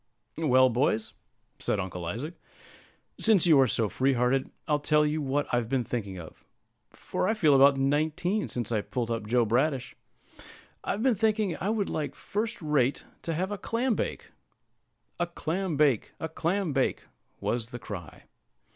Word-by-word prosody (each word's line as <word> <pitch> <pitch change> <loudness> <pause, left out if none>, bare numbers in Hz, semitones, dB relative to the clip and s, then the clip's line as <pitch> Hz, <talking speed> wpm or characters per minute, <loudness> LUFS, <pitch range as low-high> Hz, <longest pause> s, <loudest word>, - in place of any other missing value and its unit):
"Well, 130 -5 +4
boys," 115 -3 0 0.5
said - - 0
Uncle 90 -2 -4
Isaac, 120 - -4 0.9
"since 215 -6 +4
you 160 -5 +6
are 135 - +5
so 110 -1 +1
free 135 +6 +1
hearted, 125 +2 +1 0.2
I'll 150 -1 +2
tell 150 +1 +3
you 150 +1 0
what 145 +1 0
I've 120 -2 +1
been 130 -2 +1
thinking 100 -5 -4
of, 80 -3 -11 0.5
for - - -3
I 220 - +2
feel 155 -9 +4
about 140 0 +6
nineteen, 155 +9 0
since 120 -2 -4
I 110 -3 +1
pulled 120 +1 -3
up 115 -2 -3
Joe 120 +1 +3
Bradish. 130 +4 0 0.9
I've 210 - -2
been 260 -2 +4
thinking 215 -3 +1
I 200 - -1
should 215 -3 0
like 150 -2 -3
first 220 +3 -3
rate 145 -3 +1 0.2
to 165 - -3
have 185 +5 -1
a 205 - -4
clam 240 +2 0
bake." - - -4 0.9
"A 175 - +1
clam 175 0 -2
bake! 140 -7 +2
a 160 - -2
clam 170 +1 -1
bake!" 135 -2 0 0.4
was 115 -1 -2
the 120 - -6
cry. 95 -8 -8
145 Hz, 165 wpm, -28 LUFS, 120-175 Hz, 0.9 s, you